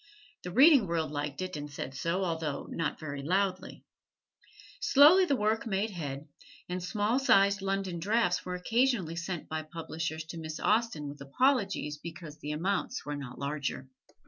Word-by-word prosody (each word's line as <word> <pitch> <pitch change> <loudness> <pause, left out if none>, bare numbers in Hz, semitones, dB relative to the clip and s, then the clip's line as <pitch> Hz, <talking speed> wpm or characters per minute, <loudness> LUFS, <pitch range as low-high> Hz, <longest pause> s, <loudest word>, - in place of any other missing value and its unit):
The 180 - -6
reading 265 - +6
world 165 -3 -1
liked 145 +3 -3
it 185 -2 -5
and 145 0 -6
said 135 -2 -6
so, 170 +7 -1
although 160 -4 -2
not 165 -3 -2
very 145 -3 -5
loudly. 185 +4 -1 1.0
Slowly 315 +7 +7
the 285 - +2
work 220 0 0
made 210 +1 0
head, 145 -5 -5 0.4
and 180 0 -4
small 210 +6 +1
sized 200 -6 +4
London 195 -2 -2
drafts 205 0 +1
were 180 - -4
occasionally 225 -3 +1
sent 175 -1 -4
by 160 0 -3
publishers 160 0 -5
to 165 - -6
Miss 155 -1 -6
Austen 215 -9 +1
with 140 0 -9
apologies 200 - +1
because 160 -2 -9
the 150 - -5
amounts 185 +6 -2
were 145 0 -3
not 135 -3 -7
larger. 140 -2 -3
175 Hz, 160 wpm, -30 LUFS, 150-200 Hz, 1.0 s, Slowly